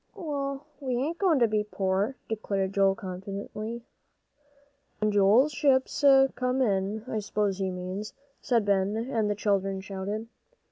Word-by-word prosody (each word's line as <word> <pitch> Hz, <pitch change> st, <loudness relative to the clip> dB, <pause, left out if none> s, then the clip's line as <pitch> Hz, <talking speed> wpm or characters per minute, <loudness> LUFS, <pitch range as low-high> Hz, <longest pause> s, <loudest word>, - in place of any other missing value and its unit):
"Well, 280 Hz, -6 st, -4 dB
we 260 Hz, -4 st, -2 dB
ain't 310 Hz, +7 st, -2 dB
goin' 365 Hz, -6 st, +3 dB
to 240 Hz, -3 st, +4 dB
be 215 Hz, -1 st, +1 dB
poor," 200 Hz, +3 st, -1 dB
declared 200 Hz, -3 st, -2 dB
Joel, 195 Hz, -1 st, +3 dB
confidently. 200 Hz, +4 st, -6 dB, 1.2 s
"When 215 Hz, 0 st, +1 dB
Joel's 205 Hz, +8 st, +5 dB
ships 280 Hz, -1 st, +1 dB, 0.3 s
come 255 Hz, +1 st, -1 dB
in, 205 Hz, -2 st, 0 dB
I 220 Hz, -, -2 dB
s'pose 205 Hz, -2 st, -1 dB
he 190 Hz, -1 st, 0 dB
means," 185 Hz, +3 st, -5 dB, 0.3 s
said 235 Hz, -6 st, +1 dB
Ben, 200 Hz, +1 st, +1 dB
and 225 Hz, -2 st, -1 dB
the 205 Hz, -, 0 dB
children 195 Hz, -2 st, 0 dB
shouted. 200 Hz, +3 st, -5 dB
210 Hz, 140 wpm, -28 LUFS, 195-250 Hz, 1.2 s, Joel's